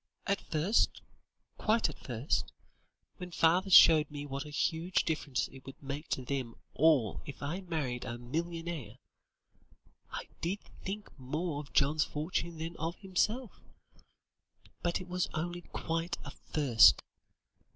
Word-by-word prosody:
At 200 +1 0
first 165 +8 +1 0.6
quite 220 +1 +3
at 150 - -8
first 120 +3 -1 0.7
when 180 -1 -7
father 175 +3 +3
showed 160 -4 +8
me 145 -1 -6
what 140 0 -4
a - - -8
huge 165 +4 0
difference 150 -5 -1
it 135 0 -13
would 135 - -9
make 145 +3 -6
to 130 - -1
them 130 -4 -3 0.2
all 140 -9 +3
if 145 0 -8
I 165 +7 -3
married 150 -9 -3
a 120 -1 -5
millionaire, 160 -2 -4 1.1
I - - -6
did 180 +4 -1 0.3
think 205 +2 -5
more 150 +4 -2
of 145 -1 -9
John's 145 +2 +3
fortune 165 +2 -3
than 165 +2 -5
of 165 +3 -2
himself. 210 +5 -1 1.2
But, 175 0 0
it 185 - -9
was 180 0 0
only 175 +2 -3
quite 165 +1 -2
at - - -7
first. 135 -7 +5
160 Hz, 140 wpm, -32 LUFS, 140-175 Hz, 1.2 s, showed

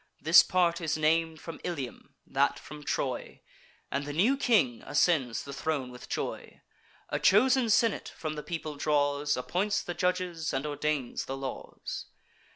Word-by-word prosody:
This 160 +3 +8
part 175 -2 +1
is 160 -2 0
nam'd 160 +1 +2
from 165 - -8
Ilium, 145 -9 -5
that - - +1
from 150 0 -10
Troy, - - -3 0.5
And 140 - -1
the 145 - -5
new 210 - +3
king 210 - +2
ascends 135 -10 +1
the 140 - -8
throne 135 -3 -2
with 125 - -11
joy; - - -4 0.5
A - - -1
chosen 250 +4 +4
senate 225 +1 +2
from 155 -1 -3
the 150 - -5
people 155 -2 -5
draws; 145 0 +1
Appoints 180 +11 0
the 175 - -4
judges, 180 -3 -1
and 135 +2 -1
ordains 145 -3 -2
the 135 - -4
laws. 135 -2 -6
155 Hz, 155 wpm, -29 LUFS, 145-180 Hz, 0.5 s, This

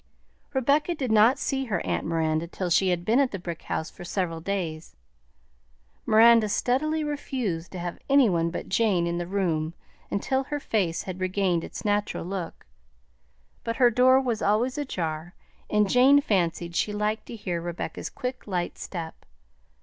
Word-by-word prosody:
Rebecca 285 +6 +2
did 260 -6 -2
not 220 +5 +5
see 270 -1 -1
her 205 -8 -1
aunt - - -1
Miranda 160 0 0
till 180 +1 -4
she 190 +2 +4
had 175 -1 -1
been 230 +6 +3
at 275 -2 +3
the 200 - -5
brick 170 -2 -6
house 160 - -3
for - - -11
several 175 -2 -2
days. 165 - -4 1.1
Miranda 225 0 +6
steadily 305 +9 0
refused 255 - -3
to - - -5
have 175 0 -5
any 275 -2 +6
one 170 -3 +1
but 170 - -5
Jane 195 -4 +2
in 170 0 -1
the 175 - -4
room 170 -4 -1 0.3
until 265 +6 -1
her 295 +1 -3
face 190 -11 -1
had 185 -1 -6
regained 185 -2 0
its - - -8
natural 205 -3 0
look, 185 -2 -5 1.0
but 230 0 -2
her 245 -1 +5
door 255 +3 +5
was 240 -5 -1
always 225 +5 +1
ajar, 175 - -4 0.3
and 210 -1 +3
Jane 260 +6 +6
fancied 170 -7 -1
she 210 - +1
liked 210 +1 -2
to - - -7
hear 180 -6 -3
Rebecca's 170 0 -5
quick, 255 -3 -6
light 180 -3 -3
step. 165 -3 -7
200 Hz, 165 wpm, -26 LUFS, 170-250 Hz, 1.1 s, Miranda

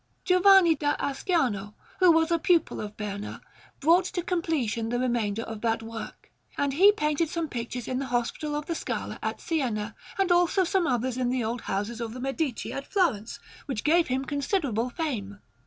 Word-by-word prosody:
Giovanni 365 -1 +6
da 290 -1 0
Asciano, 260 - -1 0.2
who 365 -2 +7
was 325 +1 +3
a 335 - +3
pupil 340 -1 +2
of 210 0 -7
Berna, 205 -1 -5 0.4
brought 340 +5 +4
to 355 -1 -3
completion 305 - -1
the 245 - 0
remainder 230 -4 0
of 220 -2 -7
that 225 -1 0
work; 225 0 -8 0.3
and 285 -1 0
he 385 +8 +7
painted 305 -3 0
some 335 0 -2
pictures 240 -2 -5
in 255 0 -1
the 275 - -3
Hospital 245 +5 -1
of 295 0 -3
the 335 - -2
Scala - - -4
at - - -3
Siena, 230 -10 -2 0.2
and 385 -2 +2
also 355 +2 +4
some 365 0 +1
others 250 0 0
in 250 -1 +1
the 250 -1 0
old 230 +2 -2
houses 210 +4 -3
of 225 -1 -4
the - - -6
Medici 270 0 -2
at 275 - -5
Florence, 285 - 0 0.3
which 255 -6 -3
gave 335 +2 +4
him 265 +1 -1
considerable 280 - -1
fame. 235 - -4
270 Hz, 185 wpm, -27 LUFS, 230-335 Hz, 0.4 s, who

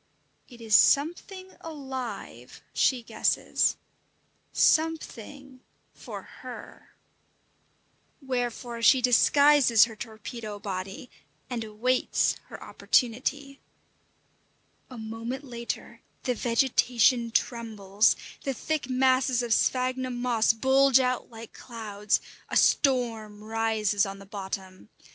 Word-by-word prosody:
It 240 -3 -15
is 220 -2 -4
something 370 +6 +2
alive, 265 -6 -7
she 250 -3 +2
guesses - - 0 0.7
something 280 -4 0 0.3
for - - -9 0.2
her! - - -11 1.2
Wherefore 245 -3 -4
she 260 +3 +6
disguises 255 -1 +5
her 230 -2 -2
torpedo 215 0 -8
body, 195 +3 -6 0.4
and 235 -2 -2
awaits 225 +4 0
her - - -10
opportunity. 275 +3 -1 1.3
A 255 - -10
moment 230 +4 -6
later 235 -3 -6 0.2
the 250 - 0
vegetation 240 0 +2
trembles, 220 -4 +1 0.3
the 270 -2 -2
thick 305 0 -3
masses 255 -1 +2
of 235 -2 +1
sphagnum 255 +1 0
moss 240 -3 +2
bulge 265 +3 +4
out 255 -1 -1
like 225 -1 -11
clouds, 210 -3 -2 0.3
a - - +1
storm 225 -6 +1
rises 215 -2 0
on 195 0 -7
the 195 - -13
bottom. 190 -1 -7
240 Hz, 100 wpm, -27 LUFS, 220-265 Hz, 1.3 s, she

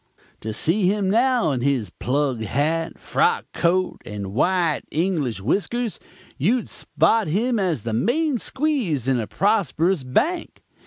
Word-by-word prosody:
To 110 - -5
see 175 - +2
him, 195 -1 +1
now, 240 - +2
in 130 -3 -2
his 125 -8 0
plug 130 0 -1
hat, 155 +9 -1
frock 460 +1 +1
coat 185 +2 0
and 100 -2 -6
white 170 - +1
English 155 - -1
whiskers, 205 - -1 0.4
you'd 225 - +1
spot 225 -4 +1
him 225 +8 0
as 170 - -1
the 115 - -3
main 255 - +1
squeeze 250 - -1
in 130 -2 +2
a 110 - -3
prosperous 190 -5 +1
bank. 320 - -1
175 Hz, 140 wpm, -22 LUFS, 130-225 Hz, 0.4 s, see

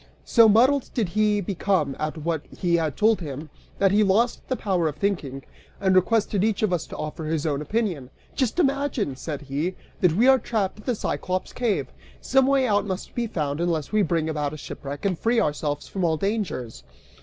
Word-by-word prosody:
So 230 -2 +6
muddled 255 +6 +4
did 220 -7 0
he 210 +1 +2
become, 180 -6 0
at 155 +2 -3
what 160 0 -2
had - - -16
been 170 -3 +2
told 215 - +2
him, 150 -1 -6 0.3
that 195 -1 +3
he 205 +2 +4
lost 215 +5 +2
the 260 - 0
power 185 -8 0
of 150 - -3
thinking, 150 -7 -2 0.4
and 190 -2 +2
requested 205 +1 +2
each 220 -1 0
of 200 -4 +2
us 175 - -1
to - - -8
offer 155 +1 -5
his 155 -1 -1
own 145 -2 0
opinion. 175 - -2 0.2
"Just 260 0 -1
imagine," 275 - 0
said 145 +1 -6
he, 145 +7 -2 0.2
"that 180 -4 +3
we 235 +7 +4
are 265 0 +6
trapped 215 -4 -2
in - - -14
the 250 - 0
Cyclops' 185 -2 -3
cave: 235 -5 0 0.3
some 265 -1 +3
way 275 -1 +3
out 205 -3 +1
must 190 -1 -5
be 240 -1 -1
found, 150 -6 -2
unless 165 -4 -1
we 215 0 +3
bring 165 -5 0
about 150 -2 -2
a - - -6
shipwreck, 140 +1 -7
and 185 -4 0
free 230 +1 +2
ourselves 150 -5 -1
from 190 - -3
all 160 -2 +2
dangers!" 185 - -3
185 Hz, 200 wpm, -24 LUFS, 155-220 Hz, 0.4 s, So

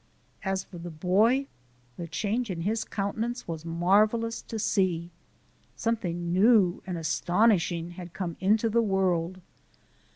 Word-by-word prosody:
As 190 -1 -1
for 175 - -11
the 175 +1 -6
boy, 200 - +2 0.5
the 170 - -6
change 215 +8 -2
in 175 -3 -3
his 215 +5 0
countenance 225 +4 -3
was 165 -2 -5
marvellous 210 +7 +2
to 225 - -6
see. 180 -5 0 0.6
Something 175 -7 -2
new 195 -2 +4
and 180 -2 -3
astonishing 175 +1 +1
had 175 -1 -9
come 175 -2 -4
into 210 +4 +3
the 230 +1 +2
world. 185 -3 0
190 Hz, 130 wpm, -28 LUFS, 175-220 Hz, 0.6 s, new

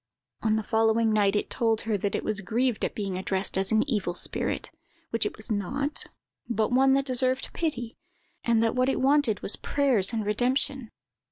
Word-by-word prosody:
"On 215 -1 +2
the 220 - -1
following 225 +1 +2
night 205 -1 +3
it 210 - -1
told 225 -3 +1
her 225 -1 -1
that 200 0 -1
it - - -2
was 215 -2 -2
grieved 235 +4 0
at - - -1
being 195 -3 -3
addressed 190 +1 0
as 190 0 0
an 220 +4 +3
evil 200 -9 -1
spirit, - - -2 0.4
which 230 -2 +1
it - - -8
was 220 +2 -8
not, 275 +9 -2 0.4
but 220 0 0
one 265 +2 +4
that 275 0 +1
deserved 255 0 0
pity; 245 -8 -3 0.5
and 230 -1 +3
that 225 - +1
what 255 +1 +2
it - - 0
wanted 270 -5 +2
was - - -1
prayers 255 -9 +1
and 220 -3 -2
redemption. 250 +3 0
225 Hz, 190 wpm, -27 LUFS, 210-255 Hz, 0.5 s, one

